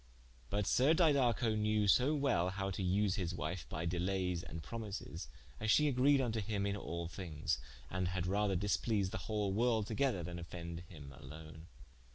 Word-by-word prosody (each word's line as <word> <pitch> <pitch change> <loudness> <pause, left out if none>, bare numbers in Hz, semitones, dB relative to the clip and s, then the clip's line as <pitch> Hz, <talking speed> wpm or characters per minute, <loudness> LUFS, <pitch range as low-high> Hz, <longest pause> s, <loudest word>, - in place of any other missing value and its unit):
But 100 +2 0
sir 140 +10 +4
Didaco 130 -9 +3
knewe 105 -1 +2
so 130 +9 +4
well 135 - +2
howe 95 +1 -2
to 95 - -3
vse 95 +2 +2
his 90 -2 -2
wife 80 -4 -4
by 80 +2 -3
delaies 90 0 0
and 80 -1 -7
promises, 105 -6 -6 0.3
as 110 - -2
she 150 +7 +5
agreed 140 +1 +4
vnto 115 -4 0
him 100 -1 -1
in 100 0 0
all 85 -4 -4
thinges, 75 -6 -3 0.3
and 90 +6 -1
had 90 -1 -2
rather 100 +1 +1
displease 100 +1 +1
the - - -3
whole 105 -3 0
world 115 0 +2
together 115 -4 0
then 85 +1 -5
offende 85 0 -7
him 70 -6 -11
alone. 80 +3 -11
95 Hz, 175 wpm, -36 LUFS, 85-110 Hz, 0.3 s, she